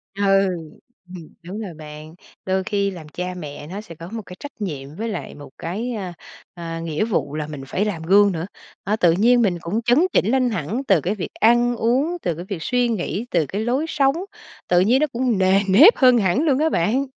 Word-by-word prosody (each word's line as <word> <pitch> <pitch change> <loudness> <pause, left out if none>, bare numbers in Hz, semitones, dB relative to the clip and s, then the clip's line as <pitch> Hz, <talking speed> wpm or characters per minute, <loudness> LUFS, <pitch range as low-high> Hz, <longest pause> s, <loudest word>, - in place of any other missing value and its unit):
Ừ, 200 - -2 0.9
ừm, 165 -3 -11
đúng 190 +6 -7
rồi 195 -6 -6
bạn. 155 +1 -11 0.3
Đôi 190 0 0
khi 200 0 -1
làm 170 -5 -10
cha 180 +3 -5
mẹ 150 -4 -8
nó 195 +5 -6
sẽ 170 -6 -12
có 165 +3 -10
một 225 - -4
cái 180 - -10
trách 285 -6 -10
nhiệm 145 -6 -5
với 225 +5 -4
lại 205 - -6
một 145 -2 -11
cái, 220 +9 -4
ờ, 190 -5 -5 0.4
ờ, 165 -1 -6
nghĩa 165 +4 -1
vụ 155 -9 -2
là 150 -1 -3
mình 145 -3 -7
phải 200 +9 -1
làm 170 -6 -3
gương 200 +4 +5
nữa. 165 -2 -3 0.4
À, 210 - 0
tự 175 -6 +4
nhiên 235 +7 +4
mình 190 -6 +1
cũng 205 +7 -2
chấn 245 +5 +3
chỉnh - - +3
lên 255 -2 +2
hẳn 215 - -3
từ 190 -6 +4
cái 190 +8 -1
việc 195 - -6
ăn 240 +2 +3
uống, 265 +10 0
từ 170 -3 -1
cái 175 - -7
việc 195 -1 -4
suy 245 -1 +1
nghĩ, 215 +1 -2
từ 165 -3 +2
cái 200 +10 -4
lối 260 +6 0
sống, 275 -3 +2 0.5
tự 175 - +4
nhiên 230 +9 +4
nó 305 - +3
cũng 245 -4 -1
nề 190 +1 +4
nếp 265 - +7
hơn 255 -2 +6
hẳn 210 - +2
luôn 285 -4 +2
á 320 - +2
bạn. 230 - +1
195 Hz, 225 wpm, -21 LUFS, 170-240 Hz, 0.9 s, nếp